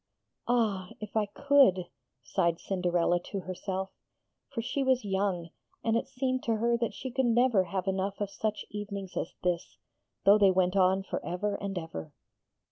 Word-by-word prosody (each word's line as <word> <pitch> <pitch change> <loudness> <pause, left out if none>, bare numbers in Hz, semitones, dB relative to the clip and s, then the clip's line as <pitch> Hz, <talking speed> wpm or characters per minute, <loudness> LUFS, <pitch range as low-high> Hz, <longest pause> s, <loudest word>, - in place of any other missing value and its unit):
'Ah, 215 -7 +1
if 210 0 -8
I 215 -2 +2
could! 260 -6 +4 0.4
'sighed 170 +5 +1
Cinderella 175 -2 +1
to 195 - -3
herself: 190 +1 -4 0.6
for 275 - -5
she 250 +4 -1
was 260 -3 +2
young, 190 -4 -1 0.3
and 225 0 +2
it 230 - 0
seemed 255 -1 -1
to 230 - +2
her 235 +2 +2
that 235 - -1
she 260 - -5
could 260 0 +1
never 235 -4 +4
have 185 +1 -3
enough 190 +1 -1
of 205 -1 -2
such 215 +1 -2
evenings 200 -2 -5
as - - -3
this, 175 -1 -1 0.5
though 205 +2 +7
they 200 -2 +6
went 185 0 +2
on 190 0 +4
for - - -4
ever 195 +4 -2
and 200 -1 -4
ever. 160 - -6
200 Hz, 170 wpm, -30 LUFS, 185-230 Hz, 0.6 s, though